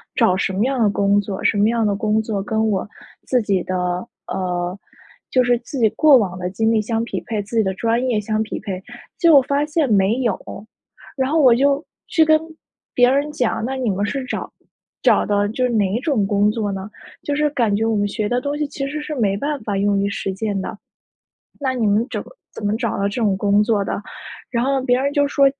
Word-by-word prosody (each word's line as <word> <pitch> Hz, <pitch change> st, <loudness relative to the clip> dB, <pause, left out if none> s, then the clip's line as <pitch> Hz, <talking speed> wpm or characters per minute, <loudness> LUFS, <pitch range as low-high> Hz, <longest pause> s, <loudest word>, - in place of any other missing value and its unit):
找 185 Hz, -, +3 dB
什 190 Hz, 0 st, -1 dB
么 205 Hz, +5 st, +1 dB
样 265 Hz, -1 st, -1 dB
的 210 Hz, -, +4 dB
工 200 Hz, 0 st, +2 dB
作， 195 Hz, -1 st, -6 dB
什 210 Hz, -, +2 dB
么 210 Hz, +2 st, +4 dB
样 230 Hz, -1 st, +1 dB
的 200 Hz, -1 st, +1 dB
工 215 Hz, +1 st, +1 dB
作 215 Hz, -3 st, -3 dB
跟 220 Hz, 0 st, 0 dB
我 200 Hz, 0 st, -1 dB, 0.4 s
自 250 Hz, -2 st, +2 dB
己 195 Hz, -4 st, 0 dB
的 185 Hz, -, -3 dB, 0.5 s
呃， 180 Hz, 0 st, -2 dB, 0.5 s
就 255 Hz, -1 st, +4 dB
是 245 Hz, -1 st, +3 dB
自 255 Hz, +2 st, -7 dB
己 220 Hz, -2 st, +4 dB
过 295 Hz, -4 st, +6 dB
往 185 Hz, -5 st, -1 dB
的 180 Hz, 0 st, -2 dB
经 220 Hz, +4 st, +1 dB
历 220 Hz, -1 st, +2 dB
相 225 Hz, +1 st, -1 dB
匹 -, -, -4 dB
配， 220 Hz, -3 st, -2 dB
自 220 Hz, +4 st, -8 dB
己 220 Hz, -, +4 dB
的 190 Hz, 0 st, -1 dB
专 230 Hz, +4 st, 0 dB
业 230 Hz, -4 st, +1 dB
相 215 Hz, +1 st, -1 dB
匹 215 Hz, -, -5 dB
配， 190 Hz, -3 st, -5 dB, 0.4 s
结 335 Hz, -1 st, +5 dB
果 280 Hz, -, +8 dB
发 280 Hz, +2 st, 0 dB
现 305 Hz, -2 st, 0 dB
没 200 Hz, +2 st, +3 dB
有。 235 Hz, -6 st, 0 dB, 0.8 s
然 265 Hz, 0 st, 0 dB
后 325 Hz, -, +3 dB
我 255 Hz, -4 st, +7 dB
就 280 Hz, +3 st, +2 dB, 0.2 s
去 320 Hz, -, +3 dB
跟 310 Hz, 0 st, +5 dB, 0.5 s
别 245 Hz, 0 st, +5 dB
人 285 Hz, +3 st, +1 dB
讲， 245 Hz, -5 st, -1 dB
那 265 Hz, -, -3 dB
你 255 Hz, -3 st, -1 dB
们 200 Hz, +1 st, 0 dB
是 270 Hz, +5 st, -3 dB
找 -, -, -5 dB, 0.5 s
找 -, -, +4 dB
的 205 Hz, 0 st, +1 dB
就 255 Hz, +3 st, -2 dB
是 -, -, 0 dB
哪 210 Hz, 0 st, +1 dB
种 275 Hz, -10 st, +1 dB
工 205 Hz, +1 st, +2 dB
作 210 Hz, -3 st, -2 dB
呢？ 195 Hz, +1 st, -5 dB, 0.3 s
就 290 Hz, -, -1 dB
是 300 Hz, 0 st, +2 dB
感 230 Hz, -8 st, +1 dB
觉 220 Hz, +2 st, 0 dB
我 225 Hz, -1 st, +1 dB
们 205 Hz, 0 st, +1 dB
学 210 Hz, +1 st, -2 dB
的 245 Hz, +1 st, 0 dB
东 285 Hz, +2 st, -2 dB
西 300 Hz, -, -1 dB
其 275 Hz, -1 st, -4 dB
实 300 Hz, +1 st, -4 dB
是 300 Hz, -, -5 dB
没 200 Hz, -5 st, +1 dB
办 290 Hz, +3 st, -2 dB
法 205 Hz, -2 st, -2 dB
用 200 Hz, 0 st, +2 dB
于 200 Hz, 0 st, 0 dB
实 195 Hz, -1 st, -3 dB
践 200 Hz, 0 st, -2 dB
的。 210 Hz, -, -6 dB, 0.8 s
那 265 Hz, -2 st, 0 dB
你 235 Hz, -4 st, -1 dB
们 210 Hz, +3 st, +2 dB
怎 -, -, -3 dB
么 -, -, -13 dB, 0.3 s
怎 205 Hz, -, -6 dB
么 205 Hz, -, +1 dB
找 230 Hz, -2 st, -2 dB
到 200 Hz, -, -1 dB
这 235 Hz, +4 st, -4 dB
种 200 Hz, -3 st, +2 dB
工 205 Hz, +1 st, +3 dB
作 210 Hz, -3 st, +1 dB
的， 200 Hz, -, -3 dB, 0.5 s
然 235 Hz, 0 st, 0 dB
后 275 Hz, 0 st, +1 dB
别 250 Hz, -1 st, +2 dB
人 280 Hz, +1 st, 0 dB
就 285 Hz, 0 st, +2 dB
说， 280 Hz, 0 st, +3 dB
220 Hz, 255 characters per minute, -20 LUFS, 200-260 Hz, 0.8 s, 果